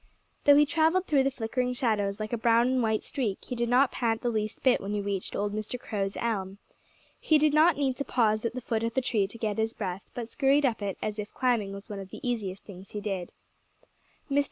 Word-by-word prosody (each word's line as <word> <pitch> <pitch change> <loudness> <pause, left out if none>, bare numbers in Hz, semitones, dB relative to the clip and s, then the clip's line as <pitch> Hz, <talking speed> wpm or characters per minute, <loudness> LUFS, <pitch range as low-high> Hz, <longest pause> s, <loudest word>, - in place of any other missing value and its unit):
Though 285 - +8
he 295 +1 +6
travelled 325 +5 +2
through 290 -5 +3
the 270 - +2
flickering 250 0 -2
shadows 215 -5 0
like 215 +2 -4
a - - +1
brown 230 +1 +4
and 260 -1 +2
white 220 -2 +1
streak, 230 -9 -2
he 250 - -4
did 235 0 -1
not 255 +1 +4
pant 225 -2 0
the 240 - +1
least 215 -1 -3
bit 255 -2 +4
when 200 +1 -4
he - - 0
reached 200 -2 -2
old 205 0 -1
Mr. 215 +3 -4
Crow's 200 -4 -3
elm. 195 -4 -2 0.6
He 310 - +4
did 300 0 +3
not 310 +1 +5
need 270 -3 0
to 280 - -1
pause 215 -5 +1
at 230 +1 -2
the 255 - -4
foot 225 -1 -1
of 230 0 -2
the 265 - +2
tree 215 -5 +1
to 215 - -10
get 220 -1 -2
his 220 +1 0
breath, 190 -2 -4
but 235 -2 -4
scurried 280 +3 +2
up 230 -5 0
it 200 -2 -3
as 215 0 -3
if 210 0 -5
climbing 235 -6 +1
was 200 0 -8
one 205 -2 -6
of 195 -1 -8
the 245 - -7
easiest 205 -6 -3
things 190 -1 -12
he 210 - -3
did. 195 -4 -4 1.0
Mr. 280 - +4
225 Hz, 245 wpm, -28 LUFS, 205-255 Hz, 1.0 s, Though